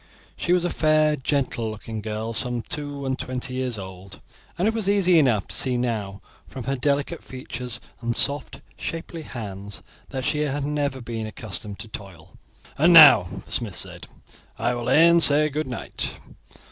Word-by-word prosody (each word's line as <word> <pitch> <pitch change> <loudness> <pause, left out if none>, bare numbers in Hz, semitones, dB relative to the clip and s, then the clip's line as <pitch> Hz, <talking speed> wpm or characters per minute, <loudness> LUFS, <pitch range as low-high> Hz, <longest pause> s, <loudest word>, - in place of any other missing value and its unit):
She 175 - -2
was 180 -1 +3
a 175 - -1
fair, 155 -1 +3
gentle 130 -5 -1
looking 110 0 -6
girl 110 +1 -4
some 120 0 0
two 145 -2 -5
and 130 0 -2
twenty 125 0 -4
years 130 -3 -2
old, 95 0 -10 0.4
and 180 +4 +1
it 225 - +1
was 220 -3 -1
easy 185 -4 +4
enough 120 -9 +2
to - - -3
see 125 -2 +1
now 110 -5 -3 0.2
from 130 - -8
her 135 +3 -1
delicate 140 +2 -1
features 125 -2 -5 0.2
and 120 0 -2
soft 140 0 -1 0.2
shapely 165 0 -5
hands 100 -7 -7 0.3
that 130 -2 -4
she 150 - 0
had 145 -1 -1
never 145 -3 -2
been 115 -2 -5
accustomed 105 -1 -5
to 110 - -8
toil. 95 -7 -10 0.4
"And 170 +4 +6
now," 150 - +9 0.2
the - - -15
smith 110 -6 +1
said, - - -4 0.5
"I 120 +2 0
will 120 -1 -3
e'en 170 +2 +6
say 150 0 +7
good 150 +1 -3
night. 125 -3 -4
130 Hz, 170 wpm, -24 LUFS, 110-150 Hz, 0.5 s, now